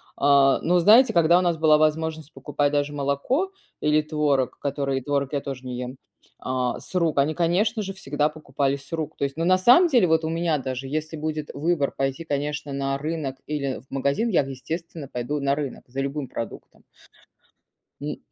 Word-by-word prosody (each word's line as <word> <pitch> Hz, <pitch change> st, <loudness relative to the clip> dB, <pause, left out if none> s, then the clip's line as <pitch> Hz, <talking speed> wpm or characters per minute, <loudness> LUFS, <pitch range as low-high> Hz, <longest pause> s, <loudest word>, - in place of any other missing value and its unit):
а. 140 Hz, -1 st, +4 dB
Но, 180 Hz, +2 st, +2 dB
знаете, 225 Hz, +7 st, +7 dB
когда 170 Hz, 0 st, +5 dB
у -, -, +1 dB
нас 175 Hz, -2 st, +1 dB
была 155 Hz, -1 st, +5 dB
возможность 155 Hz, 0 st, 0 dB
покупать 145 Hz, -1 st, -1 dB
даже 145 Hz, 0 st, 0 dB
молоко 145 Hz, -, 0 dB, 0.3 s
или 150 Hz, 0 st, +3 dB
творог, 150 Hz, -4 st, 0 dB
которые 140 Hz, -1 st, -1 dB
творог 140 Hz, +1 st, -1 dB
я 140 Hz, -, 0 dB
тоже 135 Hz, -2 st, -7 dB
не 125 Hz, -1 st, -5 dB
ем, 125 Hz, +1 st, -6 dB, 0.4 s
а, 125 Hz, -1 st, -2 dB
с -, -, -10 dB
рук, 165 Hz, -5 st, +1 dB
они, 140 Hz, +3 st, +3 dB
конечно 195 Hz, +7 st, +1 dB
же, 195 Hz, -1 st, -4 dB
всегда 150 Hz, -4 st, -1 dB
покупали 140 Hz, -2 st, -2 dB
с 140 Hz, +3 st, -12 dB
рук 160 Hz, -2 st, -4 dB
то -, -, -3 dB
есть. 140 Hz, +2 st, -2 dB
Но 165 Hz, -, 0 dB
на 185 Hz, +1 st, +5 dB
самом 250 Hz, -, +6 dB
деле, 245 Hz, -, +4 dB
вот 160 Hz, 0 st, +2 dB
у -, -, -1 dB
меня 165 Hz, -1 st, 0 dB
даже, 130 Hz, 0 st, -4 dB
если 155 Hz, +2 st, -3 dB
будет 155 Hz, 0 st, -3 dB
выбор 150 Hz, -1 st, 0 dB
пойти, 135 Hz, +4 st, -2 dB
конечно, 145 Hz, 0 st, -3 dB
на 135 Hz, 0 st, -1 dB
рынок 150 Hz, -3 st, -3 dB
или 140 Hz, -3 st, -2 dB
в 130 Hz, -, -30 dB
магазин, 140 Hz, -, 0 dB
я, 185 Hz, -, +3 dB
естественно, 160 Hz, +3 st, -6 dB
пойду 125 Hz, +5 st, -3 dB
на 140 Hz, 0 st, +1 dB
рынок 145 Hz, -3 st, -5 dB
за 130 Hz, +2 st, -6 dB
любым 140 Hz, 0 st, -3 dB
продуктом. 115 Hz, -2 st, -8 dB, 1.2 s
Н -, -, -4 dB
150 Hz, 190 wpm, -24 LUFS, 140-165 Hz, 1.2 s, знаете